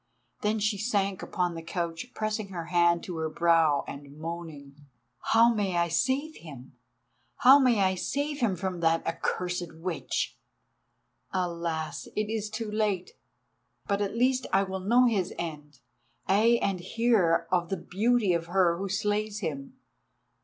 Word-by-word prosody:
Then 210 +1 +1
she 210 -1 0
sank 200 -3 0
upon 180 -1 -1
the 165 - -6
couch, 165 +2 -4
pressing 215 -1 -2
her 175 -4 -6
hand 170 -1 +4
to 175 -3 -6
her 160 0 -2
brow 165 -3 +3
and 140 +1 -9
moaning: 155 -4 -8 0.3
"How 230 +1 +4
may 200 -5 -1
I 170 0 +2
save 275 - 0
him? 135 -6 -12 0.6
How 270 +2 +7
may 245 -6 +3
I 190 -1 +3
save 285 +10 -2
him 220 -6 +1
from 185 0 -3
that 165 0 +2
accursed 175 0 -2
witch? 170 +1 -3 0.9
Alas! 170 -3 -3
It 215 0 -1
is 215 -1 -2
too 220 0 -4
late—but 205 0 -4
at 205 +2 -2
least 255 +1 +2
I 195 +1 +4
will 190 0 -4
know 235 +7 +4
his 205 -7 0
end, 150 -5 -7 0.5
ay, 220 +5 +4
and 195 -2 0
hear 195 -3 +2
of 175 -2 +1
the 195 - -1
beauty 210 +3 +1
of 165 -1 -1
her 175 -1 +2
who 195 0 -3
slays 210 +2 -1
him. 140 -6 -5
185 Hz, 150 wpm, -28 LUFS, 170-215 Hz, 0.9 s, How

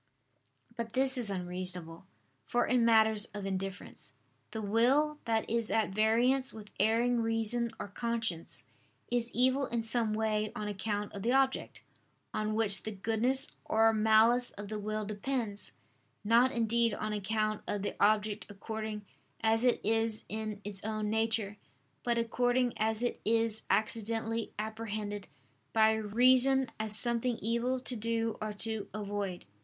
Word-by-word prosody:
But 230 -1 -5
this 265 +1 +3
is 240 -5 0
unreasonable. 180 -2 -3 0.4
For 240 0 +1
in 245 -1 +2
matters 220 -2 +4
of 205 -1 -5
indifference, 195 0 -5 0.4
the 220 - -5
will 255 +9 +2
that 225 -1 0
is 230 -1 -1
at 220 -2 +1
variance 240 +6 +2
with 210 -1 -11
erring 230 +3 +3
reason 225 +1 +1
or - - -4
conscience, 225 -5 -2 0.5
is 240 -1 +1
evil 260 +2 +2
in 235 -1 -2
some 225 -1 +1
way 215 -1 0
on 210 0 -4
account 205 0 -3
of 200 - -6
the 240 +5 +1
object, 270 0 +1 0.5
on 215 0 -1
which 210 -3 +4
the 220 - -5
goodness 230 +7 +1
or 225 +1 +3
malice 220 +3 +4
of 205 0 -8
the 215 -1 -4
will 215 +1 -3
depends; 215 0 -3 0.5
not 235 +4 +4
indeed 230 -1 +2
on 215 0 -3
account 215 +1 -1
of 205 -1 -2
the - - -3
object 210 0 +2
according 215 +1 -6 0.4
as 225 +1 +2
it 250 -1 +3
is 225 0 0
in 215 -1 -4
its 200 -1 -6
own 215 -1 -2
nature; 220 -2 0 0.5
but 235 -1 0
according 245 +1 +1
as 220 +1 0
it 245 - -2
is 225 0 +1
accidentally 225 +2 -1
apprehended 210 -2 -4 0.5
by 220 0 +5
reason 255 +5 +3
as 215 -1 -1
something 235 +2 +1
evil 235 +3 0
to 250 0 -4
do 225 0 -1
or 215 0 -2
to 220 0 -4
avoid. 205 -3 -4
220 Hz, 145 wpm, -31 LUFS, 210-235 Hz, 0.5 s, by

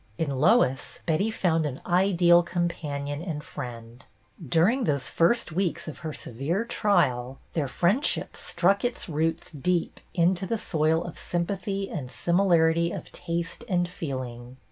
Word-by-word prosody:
In 160 -3 -1
Lois, 135 - +2
Betty 175 +6 +1
found 170 -7 +1
an 135 -2 -6
ideal 175 -1 +5
companion 155 -5 -3
and 160 -4 -4
friend; 120 -1 -8 0.4
during 180 - +3
those 140 -5 0
first 175 +3 +2
weeks 180 +1 -1
of 155 - -7
her 160 -2 -4
severe 150 - -3
trial, 130 - +1 0.2
their 150 -4 0
friendship 190 - 0
struck 195 +3 +1
its 245 0 -2
roots 160 +1 -1
deep 170 +3 -1 0.2
into 180 +2 +2
the 230 - 0
soil 160 -3 +1
of 170 -2 -8
sympathy 195 +3 -2
and 140 -9 -5
similarity 170 -1 +3
of - - -7
taste 170 +5 -4
and 175 -2 +2
feeling. 130 -7 -6
170 Hz, 140 wpm, -27 LUFS, 145-180 Hz, 0.4 s, ideal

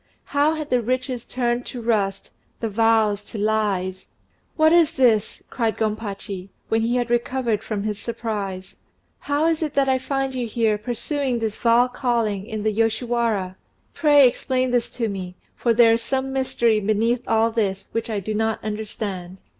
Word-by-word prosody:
How 290 +3 +2
had 305 -1 -6
the 250 -1 +3
riches 255 +1 -2
turned 240 -1 -1
to 250 - -6
rust, 210 -4 -1 0.3
the 225 - -2
vows 215 -1 +2
to 225 - -8
lies! 200 -3 -1 0.5
"What 315 +1 +5
is 340 -3 +5
this?" 225 -5 +2
cried 225 -3 -1
Gompachi, 205 -3 -4 0.2
when 225 0 +2
he 235 +2 +1
had 245 -1 -1
recovered 240 -2 0
from 210 -2 -3
his 210 -1 -3
surprise. 205 -5 -4 0.4
"How 290 +2 0
is 330 -1 +1
it 305 -3 -2
that 275 -1 +3
I 260 -1 +2
find 270 0 -2
you 250 -2 -2
here 220 -2 +1
pursuing 250 +3 -2
this 220 -2 -2
vile 235 +1 +4
calling, 230 -6 -1
in 215 -3 -4
the 215 0 +1
Yoshiwara? 225 -3 0 0.4
Pray 290 -4 +6
explain 255 +1 -1
this 245 -1 +1
to 230 -2 -1
me, 185 -3 -5 0.2
for 235 - +1
there 230 0 +6
is 230 - 0
some 265 +2 -2
mystery 235 -4 +1
beneath 220 +4 +1
all 225 0 +3
this 195 -4 -1
which 230 0 -3
I 215 -2 -1
do 215 +3 -4
not 220 +1 0
understand." 205 -4 -5
230 Hz, 170 wpm, -23 LUFS, 210-250 Hz, 0.5 s, Pray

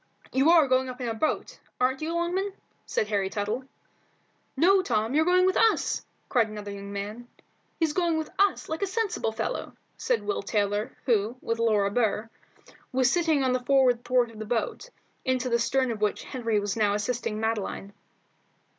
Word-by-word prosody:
"You 270 +4 +4
are 330 -4 +6
going 260 0 +2
up 250 0 -8
in 250 - -3
our 225 - -1
boat, 300 +8 -2 0.2
ain't 260 +2 +1
you, 315 +1 -2
Longman?" 365 +4 -1 0.3
said 215 - 0
Harry 200 -2 0
Tuttle. 210 +6 -3 0.9
"No, 380 +6 +5
Tom, 225 - 0
you're 315 +2 +3
going 365 +1 +4
with 375 - +2
us," 450 -1 +2 0.2
cried 230 -4 +2
another 210 -1 -7
young 200 0 -7
man. 210 +4 -5 0.5
"He's 320 -3 +1
going 340 -1 +1
with 315 -1 -4
us, 400 -1 +2
like 315 +1 -4
a 400 - +1
sensible 410 - -1
fellow," 220 - -3 0.2
said - - 0
Will 410 - -1
Taylor, 205 0 -1
who, 225 0 +1
with 230 -1 -3
Laura 210 -3 +2
Burr, 220 -1 0 0.6
was 255 -1 +3
sitting 325 -5 +2
on 255 -1 +2
the 255 - +1
forward 250 -2 +3
thwart 245 -1 +2
of 220 - -12
the 220 - -5
boat, 240 - -2 0.3
into 255 -1 0
the 235 0 +2
stern 260 +1 +1
of 215 -2 -5
which 210 -1 0
Henry 230 -5 -1
was 205 -1 -2
now 210 -2 +2
assisting 215 0 -2
Madeline. 215 -2 -2
245 Hz, 180 wpm, -27 LUFS, 215-315 Hz, 0.9 s, are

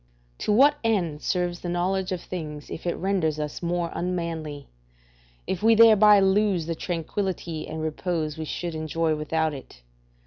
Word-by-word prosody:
To - - -1
what 285 +7 +5
end 175 -10 0
serves 175 -2 -1
the 175 - -5
knowledge 185 +2 -1
of 180 -2 -2
things 150 -5 -7
if 175 - -6
it 170 - 0
renders 175 -5 0
us 150 -1 -4
more 175 -1 -1
unmanly? 165 -5 -4 0.8
if 185 - -3
we 225 +1 +5
thereby 215 -2 +7
lose 195 -3 +2
the 165 - -2
tranquillity 170 0 -3
and 160 0 -5
repose 155 -1 -2
we 160 -1 -5
should 170 +2 -4
enjoy 160 +1 -1
without 155 +1 -1
it? 135 - -11
175 Hz, 160 wpm, -25 LUFS, 155-190 Hz, 0.8 s, thereby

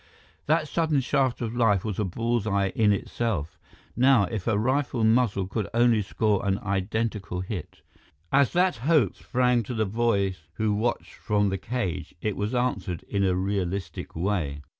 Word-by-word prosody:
That 155 +1 +2
sudden 160 -1 +1
shaft 130 -1 0
of 115 0 -3
light 105 -6 +3
was 105 -3 -3
a - - +2
bull's 115 +3 -1
eye 100 -1 +1
in 105 +2 +2
itself. 90 -5 -2 0.4
Now, 130 -3 +5
if 100 -1 -4
a 110 -3 +2
rifle 130 +1 0
muzzle 110 -4 +3
could 100 +2 -3
only 120 -2 +4
score 105 0 0
an 100 -1 +1
identical 100 -1 -2
hit! 95 0 -7 0.5
As 140 -3 +4
that 180 -2 +2
hope 135 - +2
sprang 125 -1 +1
to 115 +3 -5
the 110 -1 +1
boys 100 -3 0 0.2
who 110 -1 +1
watched 115 +3 -2
from 105 -1 0
the 95 0 -2
cage, 95 -9 -3
it 105 +2 -2
was 105 +5 -2
answered 100 -9 -1
in 100 -1 0
a 95 -2 +2
realistic 95 0 -3
way. 80 -6 -2
105 Hz, 165 wpm, -26 LUFS, 95-120 Hz, 0.5 s, Now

